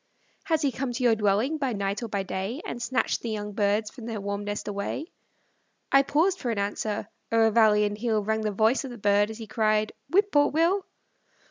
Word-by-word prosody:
Has 320 -4 +1
he 280 - +2
come 260 0 -3
to 255 - -3
your 240 -2 +5
dwelling, 215 +9 +1
by 265 -4 0
night 200 +1 -2
or 235 - -3
by 200 -2 -2
day, 195 +7 -4
And 240 - -5
snatched 260 +2 0
the 235 - -4
young 210 -1 -4
birds 210 +1 +1
from 235 -3 -10
their 225 -2 -4
warm 200 +1 -4
nest 205 0 -4
away? 205 +8 -3 0.9
I 275 - +7
paused 330 +7 +1
for 250 - -3
an 225 - -1
answer; 205 +1 -2 0.2
o'er 225 -1 +4
valley 215 -2 +5
and 205 0 -2
hill 215 -1 0
Rang 220 +1 0
the 215 -1 -1
voice 220 +7 +2
of 270 - -6
the 245 - -8
bird, 205 0 +3
as 220 - -7
he 225 - -7
cried, 215 -1 +1 0.2
"Whip 400 +3 +3
poor 290 0 +5
Will." 340 +6 +1
220 Hz, 220 wpm, -26 LUFS, 205-260 Hz, 0.9 s, I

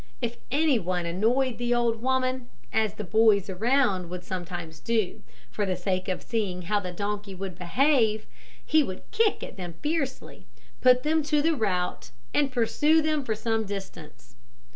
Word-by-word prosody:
If 235 -1 -3
any 285 -1 +3
one 180 -2 -2
annoyed 230 +8 +1
the 240 0 +1
old 230 -2 +1
woman 255 -1 0 0.2
as 220 -2 +1
the 215 - -5
boys 210 -1 +3
around 205 -3 +1
would 180 0 -6
sometimes 175 -3 -6
do, 220 -3 -1 0.3
for 210 - -2
the 190 -2 0
sake 185 +1 -2
of 185 - -2
seeing 200 -6 -2
how 205 +4 +1
the 185 -3 -5
donkey 200 +1 -4
would 190 -1 -5
behave 220 - +2 0.4
he 315 - +4
would 185 -10 -4
kick 445 -1 +2
out - - -5
at - - -18
them 175 -3 -6
fiercely, 295 -4 -3 0.3
put 250 0 +5
them 315 +1 +2
to 300 -1 +2
the 325 0 +3
rout, 185 -7 -1 0.2
and 285 -2 +2
pursue 295 +6 +3
them 310 -2 +1
for 220 -4 -1
some 225 0 0
distance. 190 - -8
220 Hz, 170 wpm, -27 LUFS, 185-260 Hz, 0.4 s, put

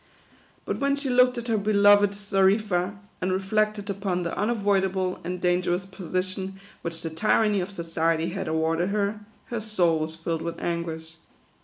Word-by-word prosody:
But - - -2
when 280 0 +2
she 280 -2 -2
looked 250 0 +4
at 240 0 -5
her 225 -2 +1
be 210 +1 0
loved 205 0 +6
Xarifa, 200 -1 +1 0.2
and 185 +1 0
reflected 205 +2 0
upon 195 -3 -2
the 170 - -3
unavoidable 195 -4 0
and 180 +1 -4
dangerous 180 +1 +1
position 190 +1 -4 0.2
which 165 -1 -5
the 165 - -3
tyranny 210 +4 +2
of 180 - -4
society 165 -2 0
had 190 +1 -4
awarded 160 +3 +1
her, 205 +1 0 0.3
her 235 -2 -2
soul 180 -7 +1
was 155 +1 -3
filled 165 0 -3
with 170 0 -4
anguish. 165 -1 -4
190 Hz, 160 wpm, -26 LUFS, 170-205 Hz, 0.3 s, loved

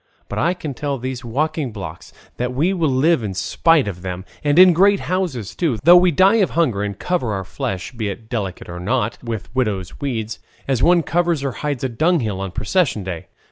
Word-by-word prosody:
But - - -3
I 175 +2 +1
can 155 -5 -5
tell 140 +2 -3
these 130 0 -5
walking 145 +3 -1
blocks 100 -3 -8 0.3
that 125 +1 -2
we 165 +8 +2
will 165 -5 +1
live 135 +3 +3
in 100 -4 -4
spite 160 - +2
of 90 -3 -5
them, 90 0 -5 0.2
and 145 +1 +2
in 185 -1 +8
great 195 +3 +4
houses 170 - -2
too, 155 -10 0
though 170 +4 +8
we 180 0 +6
die 190 +7 +4
of 200 -4 +3
hunger 130 -12 +1
and 100 -1 -3
cover 170 - -1
our 95 -1 -3
flesh, 95 +1 -4
be 115 -5 -3
it 100 +3 -8
delicate 100 -6 -4
or 85 0 -7
not, 115 +4 -1
with 115 -3 -5
widow's 105 -8 -2
weeds, 115 -5 -3 0.3
as 130 -3 0
one 175 +2 +4
covers 170 -3 0
or 135 - -1
hides 145 -1 -4
a - - +2
dunghill 120 - 0
on 95 - -3
a - - -13
procession 135 - 0
day. 90 -3 -6
130 Hz, 215 wpm, -20 LUFS, 105-165 Hz, 0.3 s, in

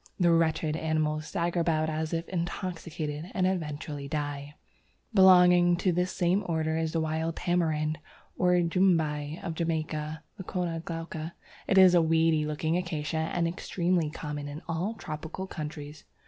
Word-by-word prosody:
The 175 -2 +4
wretched 160 -2 +2
animals 155 -1 -1
stagger 175 -1 -1
about 160 -2 +1
as 155 0 -2
if 165 0 -2
intoxicated, 170 -3 -4
and 185 - +2
eventually 150 -5 -3
die. 145 -1 -4 0.6
Belonging 180 -2 +6
to 185 0 +1
this 180 +1 0
same 180 +2 +1
order 160 -1 0
is 160 -1 -1
the 165 - +1
Wild 160 +1 -1
Tamarind, 160 -3 0 0.4
or 180 -1 +3
Jumbai, 165 -4 +1
of 170 - -3
Jamaica 160 -1 -3 0.2
(Leucæna 175 -3 -3
glauca). 165 -1 -5 0.3
It 195 - +2
is 185 -1 +8
a 175 - +6
weedy 160 -1 +2
looking 155 +2 0
acacia, 160 -2 -2
and 170 -1 +1
extremely 170 -1 0
common 150 -1 -5
in 145 +2 -7
all 175 +7 -2
tropical 160 +1 -6
countries. 150 -3 -7
165 Hz, 145 wpm, -28 LUFS, 155-175 Hz, 0.6 s, is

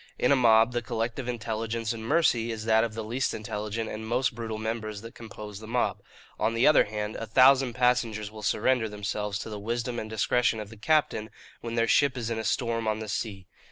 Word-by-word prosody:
In 125 - +2
a - - +7
mob 115 -2 +5
the 120 - 0
collective 115 +3 -3
intelligence 115 -1 -2
and 110 -1 -7
mercy 120 -4 +2
is 110 -1 -5
that 110 0 +4
of 115 -2 -3
the 110 - -4
least 120 +5 -1
intelligent 105 +1 -4
and 110 0 -6
most 125 +2 +1
brutal 110 -1 -5
members 110 -1 -4
that 115 +1 -10
compose 105 -2 -9
the 110 - -10
mob. 120 +2 0 0.4
On 115 +2 +1
the 115 - +3
other 150 - +6
hand, 105 0 -4
a 115 - -5
thousand 130 +2 +5
passengers 120 -4 +1
will 110 0 -10
surrender 110 +2 +1
themselves 105 0 -3
to 110 - -6
the 105 - -5
wisdom 120 +3 -2
and 110 - -6
discretion 110 +1 +1
of 105 -2 -6
the - - -10
captain, 120 -4 +1 0.3
when 115 0 -5
their 115 0 +2
ship 140 -1 +3
is 115 -2 -3
in 115 - -1
a - - -3
storm 115 0 -1
on 110 0 +1
the 110 0 -6
sea. 100 -4 -4
115 Hz, 220 wpm, -27 LUFS, 110-120 Hz, 0.4 s, a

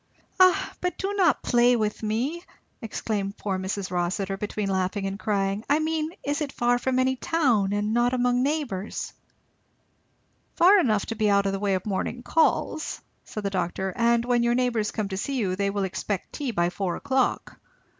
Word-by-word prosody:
"Ah 370 -1 +4
but 360 0 -2
do 390 +1 -2
not 370 -6 +2
play 245 0 +4
with 215 -2 -1
me," 245 +11 -2 0.4
exclaimed 205 -3 -3
poor 190 -2 -2
Mrs. 190 0 -3
Rossitur 185 +2 -1
between 210 0 -3
laughing 190 +1 -1
and 195 +1 -4
crying; 200 -1 -1
"I 290 - +4
mean 315 0 -1
is 290 +3 -1
it 290 -2 -2
far 245 0 +1
from 255 +1 0
any 260 0 +2
town 245 -10 +1
and 205 +1 0
not 240 +1 +3
among 245 -1 +2
neighbours?" 270 -9 -2 1.4
"Far 385 +4 +6
enough 215 - +2
to 225 - -4
be 215 -1 +1
out 200 0 +3
of 195 - +1
the 195 - -3
way 200 -1 +1
of 185 - -4
morning 215 +4 -3
calls," 315 +1 +1 0.3
said 215 - -6
the 200 - -1
doctor; 185 +1 -2
"and 235 0 +2
when 245 -1 +2
your 235 0 +2
neighbours 245 -4 +1
come 215 -2 -3
to 190 - -4
see 275 +7 -2
you 190 -6 0
they 200 +1 0
will 200 0 -1
expect 190 0 -3
tea 285 -3 -3
by 175 -6 0
four 185 -2 -2
o'clock. 265 -1 -1
220 Hz, 185 wpm, -26 LUFS, 195-260 Hz, 1.4 s, Far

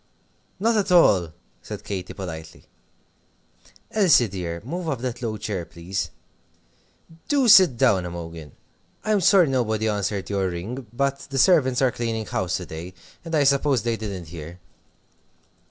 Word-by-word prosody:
"Not 225 +3 +2
at 200 -2 0
all," 95 - +5 0.3
said - - -8
Katy, 95 -3 -5
politely. 80 -5 -8 1.3
"Elsie, 180 - +4
dear, 90 -4 -5
move 170 +4 -4
up 140 - -1
that 125 -1 -4
low 110 -3 -3
chair, 105 -4 -4
please. 85 +4 -5 1.2
Do 280 -4 +2
sit 185 - +7
down, 95 -5 +3
Imogen! 85 -3 -8 0.5
I'm 215 -2 +2
sorry 185 -1 +5
nobody 110 -5 0
answered 100 -2 -2
your 100 -2 -1
ring, 110 +9 -6
but 140 +3 -1
the 135 - -4
servants 130 -4 +4
are 130 - +3
cleaning 115 -2 -3
house 90 -1 -2
to 90 - -7
day, 85 +3 -8 0.3
and 165 -1 -3
I 150 - +4
suppose 140 -3 +2
they 115 -1 0
didn't 100 -7 -6
hear." 85 +1 -9
110 Hz, 145 wpm, -23 LUFS, 90-140 Hz, 1.3 s, sit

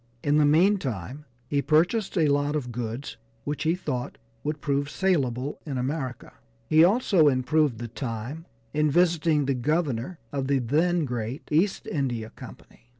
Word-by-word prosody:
In 145 +1 +3
the 150 - +5
meantime 150 - +1 0.2
he 140 +1 +1
purchased 180 +8 +2
a 160 - +4
lot 145 +1 +1
of 125 -5 -3
goods 120 +3 -5 0.3
which 145 0 -3
he 160 +2 +2
thought 140 -9 -4 0.3
would 150 +1 -2
prove 140 -1 -1
salable 140 -8 0
in 140 -4 -4
America. 130 -1 -4 0.3
He 155 +4 +6
also 190 -4 +4
improved 140 0 +2
the 120 +1 -5
time 120 +6 -6 0.3
in 150 0 +2
visiting 165 -2 +3
the 135 - +1
Governor 145 +2 -1
of 135 -2 -2
the 140 0 +2
then 155 +7 +1
great 120 +1 -4
East 175 +6 +1
India 120 -7 -2
Company. 120 - -14
145 Hz, 150 wpm, -26 LUFS, 125-160 Hz, 0.3 s, He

